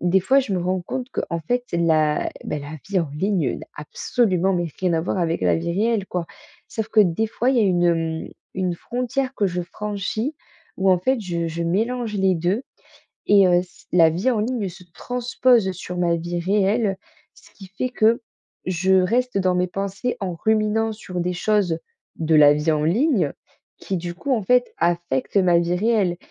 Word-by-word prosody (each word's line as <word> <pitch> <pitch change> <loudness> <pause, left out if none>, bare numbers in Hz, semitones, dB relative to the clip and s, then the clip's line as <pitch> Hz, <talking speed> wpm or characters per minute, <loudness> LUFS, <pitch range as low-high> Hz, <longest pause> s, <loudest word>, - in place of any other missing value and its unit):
des 180 +2 +3
fois 270 +9 +4
je 240 -6 -4
me 185 - +1
rends 185 +1 -1
compte 255 +7 -5
qu'en 170 -2 -3
fait 245 +10 -1
la 160 -3 +2
bah, 150 - -3
la 145 +2 -8
vie 195 -2 +1
en 165 - -3
ligne 170 -2 -1
n'a - - -11
absolument 190 - 0
mais 175 -2 0
rien 180 -2 +1
à 160 - +1
voir 180 +3 -2
avec 170 -1 0
la - - +3
vie 170 +1 -2
réelle, 210 +1 0
quoi. 175 -2 -3 0.4
Sauf 220 -7 -4
que 220 - +4
des 205 +3 +2
fois 240 +3 0
il 265 - +1
y - - +4
a - - +4
une, 180 -3 +2
hem, 165 -2 0 0.3
une 185 -2 -1
frontière 250 +6 -3
que 205 - +1
je 180 -1 -2
franchis 210 - -4 0.4
où, 190 0 +3
en 185 - +4
fait, 260 +7 0
je 170 -4 -2
je 165 +1 -4
mélange 220 +6 -1
les 190 -2 +2
2 180 +8 0 0.6
et 200 -2 +6
heu, 175 0 +4
c 180 - -20
la 165 -2 +6
vie 180 +10 0
en 225 - 0
ligne 225 -2 -1
se 180 +1 -13
transpose 245 -2 +1
sur 180 0 -7
ma 175 -1 +2
vie 175 +1 -3
réelle, 200 +3 +1 0.4
ce - - -20
qui 195 - -13
fait 200 +7 -3
que 230 0 +2 0.4
je 185 +1 +1
reste 235 +5 +2
dans 185 -1 +1
mes 180 0 +1
pensées 195 +6 -3
en 185 -3 -3
ruminant 220 +3 +1
sur 185 -4 -6
des 180 +1 -1
choses 180 -3 +1 0.4
de 160 -1 +1
la 145 -1 +7
vie 150 +2 0
en 150 -1 0
ligne 195 - +2 0.5
qui, 190 - -3
du 175 0 -5
coup, 275 +10 -4
en 225 - +1
fait, 245 +5 +2
affectent 170 -2 0
ma 180 -3 +4
vie 170 +1 0
réelle 200 -3 +1
185 Hz, 200 wpm, -22 LUFS, 170-220 Hz, 0.6 s, la